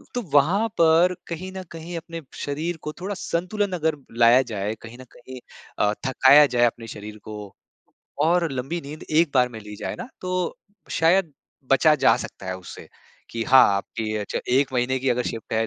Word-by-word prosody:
तो 245 - 0
वहाँ 180 +10 +4
पर 170 +2 +5
कहीं 175 +3 -5
न 185 - -5
कहीं 170 +1 -7
अपने 165 0 -7 0.2
शरीर 160 +4 -3
को 150 - -5
थोड़ा 200 +2 -3
संतुलन 190 +4 -2
अगर 160 0 +1 0.2
लाया 120 +2 +7
जाए, 105 +2 -2
कहीं 115 +1 -11
न - - -12
कहीं 130 +1 -11 0.4
अ, 105 - +3
थकाया 135 +3 +7
जाए 120 0 +5
अपने 115 -1 -2
शरीर 105 0 -9
को 105 -2 -9 0.7
और 170 0 +2
लंबी 135 +7 -3
नींद 150 +1 -9
1 160 0 +3
बार 125 -1 +4
में 115 -3 -9
ली 105 0 -10
जाए - - -4
ना। 245 - -7
तो 185 -1 -2 0.4
शायद 170 0 +3 0.4
बचा 155 +3 +5
जा - - +6
सकता 95 - -8
है 95 0 -3
उससे, 90 - -11 0.4
कि 115 -1 -3
हाँ, 130 +2 +7
आपकी 110 +2 -4
अच्छा 105 - -3
1 135 +1 +2
महीने 125 +2 +1
की 130 +1 -2
अगर 125 +1 +1
शिफ्ट 115 -2 -6
है, 110 0 +1
140 Hz, 190 wpm, -23 LUFS, 115-170 Hz, 0.7 s, लाया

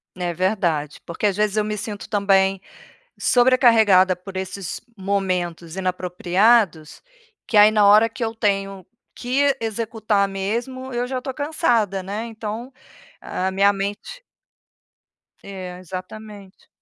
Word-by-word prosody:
É 175 -1 -3
verdade, 170 -5 -1
porque 170 +5 -4
às 200 -2 +1
vezes 210 -1 +1
eu 215 - +2
me 210 0 -3
sinto 205 -1 -7
também 195 -2 +2 0.6
sobrecarregada 230 -7 +4
por 185 +2 -11
esses 190 -1 -5 0.2
momentos 185 -4 -2
inapropriados, 185 -1 +1 0.5
que 220 - -2
aí 210 +1 +8
na 210 -1 +4
hora 210 +3 +6
que 230 +1 -5
eu 225 0 -3
tenho 195 -3 -1 0.3
que 270 +2 +1
executar 220 -2 -1
mesmo 235 +7 -4
eu 240 0 -1
já 255 0 -4
tô 265 - -4
cansada, 245 - 0
né, 205 +4 -5
então, 225 +2 -6 0.5
a 190 +1 -3
minha 200 +1 +4
mente 205 - -5 1.2
É, 185 -2 -8
exatamente. 195 +2 -10
200 Hz, 125 wpm, -22 LUFS, 185-225 Hz, 1.2 s, aí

